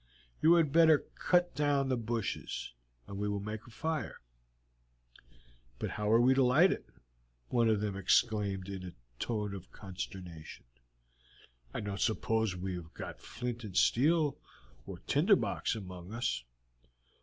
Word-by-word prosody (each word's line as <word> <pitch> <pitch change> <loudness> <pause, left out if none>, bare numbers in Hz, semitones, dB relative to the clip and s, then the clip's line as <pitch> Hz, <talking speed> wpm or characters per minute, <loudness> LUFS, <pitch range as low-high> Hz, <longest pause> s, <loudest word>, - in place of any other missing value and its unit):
"You 165 +2 +7
had 160 -4 +3
better 160 -1 +5
cut 175 -1 +2
down 140 -1 +1
the 130 - +2
bushes, 115 - -3 0.3
and 100 +7 -7
we 105 0 -1
will 100 0 -1
make 105 +3 -6
a - - -11
fire." 160 +7 -3 1.6
"But - - -3
how 105 0 -1
are 115 - +6
we 125 +2 +5
to 135 - +3
light 145 +9 +5
it?" - - -4 0.6
one 115 -2 +3
of 105 -2 +2
them 105 -2 -2
exclaimed 100 -1 +1
in 95 -1 -6
a 90 - -7 0.3
tone 105 -4 -2
of 95 -2 -9
consternation. 90 -4 -8 1.1
"I - - -4
don't 100 -1 -4
suppose 110 -2 +1
we 95 +1 -4
have 85 -2 -8
got 90 -9 -7
flint 120 -1 -5
and 100 -4 -5
steel 150 +3 +3 0.5
or - - -6
tinder - - +4
box - - -1
among 90 -2 -8
us." 115 - -1
110 Hz, 150 wpm, -32 LUFS, 95-130 Hz, 1.6 s, You